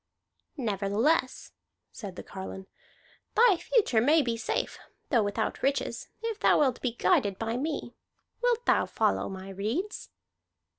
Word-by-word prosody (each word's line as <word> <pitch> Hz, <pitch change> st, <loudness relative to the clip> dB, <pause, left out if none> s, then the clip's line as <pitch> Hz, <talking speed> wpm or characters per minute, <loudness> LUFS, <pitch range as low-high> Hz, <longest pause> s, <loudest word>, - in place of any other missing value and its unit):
"Nevertheless," 225 Hz, -, 0 dB, 0.4 s
said 200 Hz, -6 st, -8 dB
the -, -, -7 dB
carline, 190 Hz, 0 st, -7 dB, 0.7 s
"the 455 Hz, -6 st, +6 dB
future 325 Hz, -, +2 dB
may 300 Hz, +5 st, +4 dB
be 235 Hz, -3 st, -1 dB
safe, 230 Hz, -, -2 dB, 0.3 s
though 240 Hz, -5 st, +5 dB
without 205 Hz, -1 st, -2 dB
riches, 275 Hz, +1 st, -1 dB
if 450 Hz, -2 st, -3 dB
thou -, -, +5 dB
wilt 260 Hz, -4 st, +2 dB
be 245 Hz, -3 st, -1 dB
guided 235 Hz, -, +2 dB
by 225 Hz, +1 st, -2 dB
me. 280 Hz, -2 st, -3 dB, 0.5 s
Wilt 485 Hz, -1 st, +1 dB
thou -, -, +3 dB
follow -, -, 0 dB
my 190 Hz, 0 st, -7 dB
redes?" 225 Hz, -, -3 dB
245 Hz, 135 wpm, -29 LUFS, 205-320 Hz, 0.7 s, the